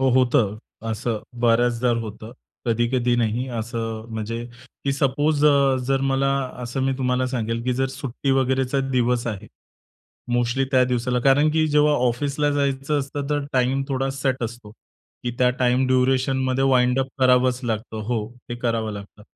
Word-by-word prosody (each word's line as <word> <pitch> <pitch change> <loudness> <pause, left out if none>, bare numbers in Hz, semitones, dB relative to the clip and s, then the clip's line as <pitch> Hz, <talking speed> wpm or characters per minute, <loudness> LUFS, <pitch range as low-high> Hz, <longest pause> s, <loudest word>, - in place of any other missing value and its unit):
हो, 135 - +3
होतं. 120 -5 +2 0.3
असं 110 0 -2 0.2
बऱ्याचदा 120 +1 +2
होतं. 110 +1 -8 0.3
कधी-कधी 120 +1 +1
नाही. 120 +2 0
असं 115 -1 -4
म्हणजे 115 +2 -4 0.4
की 140 - +1
सपोज 145 +2 +1
अ, 140 -2 +4
जर 135 0 +1
मला 135 +1 +1 0.3
असं 125 +3 -3
मी 135 0 +1
तुम्हाला 130 0 +1
सांगेल, 115 -2 -2
की 125 - +1
जर 135 +2 +1
सुट्टी 135 0 -4
वगैरेचा 130 0 +1
दिवस 125 -1 +1
आहे. 105 -5 -4 0.9
मोस्टली 120 +2 +1
त्या 130 -1 +5
दिवसाला. 125 0 0
कारण 140 +4 +4
की 155 0 +2
जेव्हा 150 0 +4 0.2
ऑफिसला 145 +4 0
जायचं 140 0 0
असतं, 140 0 -4
तर 145 -1 0
टाईम 130 +1 +1
थोडा 135 0 -1
सेट 135 -1 -2
असतो. 115 -2 -6 0.5
की 120 - 0
त्या 125 - +4
टाईम 125 +1 +2
ड्युरेशनमध्ये 130 0 +1
वाइंड 125 -1 +3
अप 135 - -2
करावंच 125 -1 +3
लागतं, 110 -1 -3
हो. 110 -1 -2 0.2
ते 120 - -3
करावं 115 -2 -1
लागतं. 100 0 -10
125 Hz, 155 wpm, -23 LUFS, 120-135 Hz, 0.9 s, त्या